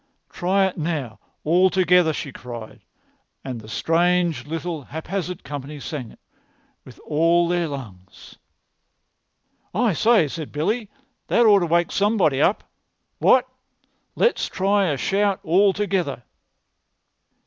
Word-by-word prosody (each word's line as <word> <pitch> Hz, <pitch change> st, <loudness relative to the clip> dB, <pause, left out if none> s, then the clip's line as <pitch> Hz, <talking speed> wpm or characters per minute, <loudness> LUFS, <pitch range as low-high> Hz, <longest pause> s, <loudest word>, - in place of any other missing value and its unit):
"Try 195 Hz, +2 st, +1 dB
it 190 Hz, -2 st, -3 dB
now 150 Hz, -7 st, -3 dB, 0.2 s
all 180 Hz, +4 st, +4 dB
together," 180 Hz, -3 st, +3 dB
she 145 Hz, -2 st, -5 dB
cried; 120 Hz, -3 st, -9 dB, 0.6 s
and 125 Hz, -4 st, -5 dB
the 110 Hz, -, -13 dB
strange 170 Hz, +1 st, +1 dB
little 165 Hz, 0 st, -4 dB
haphazard 175 Hz, +4 st, -5 dB
company 145 Hz, +1 st, -7 dB
sang 140 Hz, -4 st, -6 dB
it -, -, -18 dB, 0.6 s
with -, -, -15 dB
all 165 Hz, +3 st, +2 dB
their 175 Hz, -1 st, 0 dB
lungs. 100 Hz, -10 st, -10 dB, 1.4 s
"I 225 Hz, -1 st, +2 dB
say," 215 Hz, -1 st, +3 dB
said 155 Hz, +1 st, -7 dB
Billy, 210 Hz, +9 st, -2 dB, 0.4 s
"that 235 Hz, -, +3 dB
ought 205 Hz, -2 st, +6 dB
to 175 Hz, -, -1 dB
wake 170 Hz, +1 st, +1 dB
somebody 195 Hz, -10 st, +2 dB
up. 195 Hz, -, +2 dB, 0.6 s
What? -, -, +4 dB, 0.7 s
Let's 475 Hz, -, +1 dB
try 195 Hz, +1 st, +1 dB
a 145 Hz, -4 st, -1 dB
shout 195 Hz, -, 0 dB
all 195 Hz, +3 st, +4 dB
together." 190 Hz, -10 st, -2 dB
170 Hz, 125 wpm, -22 LUFS, 145-195 Hz, 1.4 s, ought